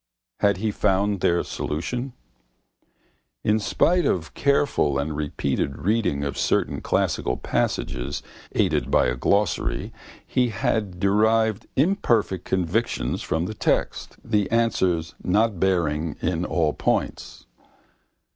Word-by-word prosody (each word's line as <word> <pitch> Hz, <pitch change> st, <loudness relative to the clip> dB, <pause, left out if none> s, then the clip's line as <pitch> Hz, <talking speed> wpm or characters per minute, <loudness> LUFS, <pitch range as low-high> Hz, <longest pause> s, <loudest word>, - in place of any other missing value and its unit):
Had 100 Hz, -2 st, +3 dB
he 110 Hz, +2 st, -1 dB
found 100 Hz, 0 st, +1 dB
their 85 Hz, 0 st, +2 dB
solution? 120 Hz, -, -4 dB, 1.3 s
In 105 Hz, +1 st, +2 dB
spite 175 Hz, -, +2 dB
of 85 Hz, -, -1 dB
careful 140 Hz, -, +2 dB
and 75 Hz, +2 st, -2 dB
repeated 70 Hz, -2 st, -2 dB
reading 105 Hz, -8 st, 0 dB
of 70 Hz, -, -3 dB
certain -, -, 0 dB
classical -, -, 0 dB
passages, 60 Hz, +2 st, -2 dB, 0.3 s
aided -, -, +1 dB
by -, -, +4 dB
a 60 Hz, -, 0 dB
glossary, 100 Hz, +9 st, 0 dB, 0.3 s
he 125 Hz, -1 st, +1 dB
had 100 Hz, -3 st, -1 dB
derived 110 Hz, +2 st, +2 dB
imperfect 120 Hz, -, +1 dB
conviction 95 Hz, +5 st, 0 dB
from 80 Hz, +2 st, -1 dB
the 110 Hz, -, -4 dB
text, -, -, -1 dB
the 105 Hz, -3 st, +1 dB
answers 95 Hz, -8 st, +1 dB
not 105 Hz, 0 st, +2 dB
bearing 85 Hz, -4 st, 0 dB
in 90 Hz, 0 st, -1 dB
all 80 Hz, -4 st, +1 dB
points. -, -, -2 dB
95 Hz, 115 wpm, -24 LUFS, 80-110 Hz, 1.3 s, by